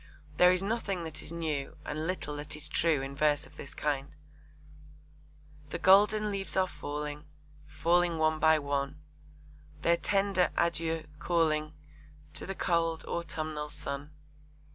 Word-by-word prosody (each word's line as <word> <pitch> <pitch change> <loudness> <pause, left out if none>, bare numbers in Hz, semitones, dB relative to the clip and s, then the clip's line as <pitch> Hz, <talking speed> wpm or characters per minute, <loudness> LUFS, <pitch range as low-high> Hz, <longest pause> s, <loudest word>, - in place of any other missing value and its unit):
There 180 0 +7
is 185 +1 +1
nothing 200 -4 -1
that 160 -2 -6
is - - -6
new 155 -5 -3
and 155 +2 -3
little 180 -5 -3
that 150 +1 -4
is 150 - -2
true 160 -5 +2
in 135 +1 -5
verse 150 0 +2
of - - -17
this 140 - -9
kind: 145 -1 -2 1.5
The - - -3
golden 210 +2 +5
leaves 195 -1 -3
are 190 - +5
falling, 150 -1 -5 0.4
Falling 170 +1 +2
one 155 0 +2
by 160 0 +6
one, 140 0 -2 0.8
Their 170 0 +4
tender 195 0 +2
'Adieux' 165 -1 0
calling 155 -3 +1 0.6
To - - -4
the 195 - -3
cold 165 -2 0
autumnal 155 -3 -3
sun. 140 +1 -4
160 Hz, 140 wpm, -31 LUFS, 150-175 Hz, 1.5 s, There